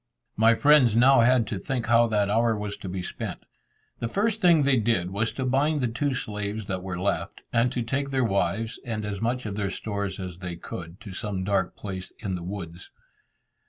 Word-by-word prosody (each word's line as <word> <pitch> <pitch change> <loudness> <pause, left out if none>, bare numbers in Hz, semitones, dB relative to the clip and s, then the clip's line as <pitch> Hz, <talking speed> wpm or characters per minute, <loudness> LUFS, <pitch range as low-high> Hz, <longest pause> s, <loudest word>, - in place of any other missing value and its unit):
My 115 +2 +5
friends 140 -5 +5
now 130 +3 +6
had 120 0 +4
to 100 -2 -4
think 125 0 -2
how 115 0 +5
that 105 -2 +1
hour 115 +2 +2
was 105 -1 -4
to 95 - -7
be 90 0 -4
spent. - - -6 0.6
The 115 - -1
first 215 - 0
thing 170 -5 +5
they 140 -1 +4
did 105 -6 +1
was 110 +3 0
to 130 - -3
bind 145 +4 +2
the 125 - +1
two 130 +4 -1
slaves 105 -2 -4
that 95 -2 -3
were 90 -1 -4
left, 100 +1 -2
and 120 +1 +3
to 120 - -1
take 140 +4 -2
their 135 -1 +1
wives, 110 +2 0
and 110 -3 -3
as 105 -1 -4
much 125 +2 -1
of 100 -2 -4
their 100 -1 -1
stores 100 0 -4
as 90 -2 -6
they 90 -2 -5
could, 85 +1 -8
to 100 - -9
some 100 -1 -3
dark 95 -1 0
place 95 -2 -6
in 95 - -4
the 90 - -3
woods. 90 -1 -7
110 Hz, 210 wpm, -26 LUFS, 95-125 Hz, 0.6 s, now